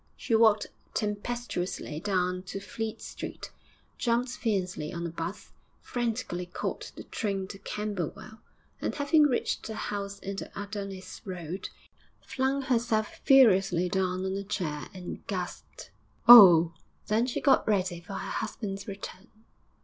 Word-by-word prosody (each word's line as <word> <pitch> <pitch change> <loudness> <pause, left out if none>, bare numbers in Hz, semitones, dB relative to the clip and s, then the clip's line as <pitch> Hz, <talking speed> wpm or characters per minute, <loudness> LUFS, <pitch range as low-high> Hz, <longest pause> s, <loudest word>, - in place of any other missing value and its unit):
She - - -3
walked 220 -2 +5 0.3
tempestuously 210 -7 -3
down 180 -1 0
to 195 - -4
Fleet 220 +3 -5
Street, - - -7 0.5
jumped 240 +1 +1
fiercely 190 - -2
on 170 0 -4
a - - -2
'bus, 170 +4 -6 0.3
frantically 230 -7 -3
caught 175 - -4
the - - -8
train 195 -3 -3
to 195 - -8
Camberwell, 210 +1 -5 0.4
and, - - -2
having 295 +1 +4
reached 255 - -1
her 220 - -5
house 200 -1 -4
in 195 0 -6
the - - -5
Adonis 200 -2 -6
Road, 180 -1 -5 0.5
flung 265 +1 -1
herself 230 -4 0
furiously 195 -9 +5
down 185 0 0
on 190 0 -1
a 200 - -3
chair 155 -7 -3
and 180 -2 -8
gasped, - - -6 0.4
'Oh!' 175 -8 +10 0.3
Then 220 +3 +2
she 250 - -2
got 275 -3 +4
ready 185 -4 +1
for 195 +4 -9
her - - -4
husband's 200 -1 -4
return. 195 -1 -8
200 Hz, 135 wpm, -29 LUFS, 185-225 Hz, 0.5 s, Oh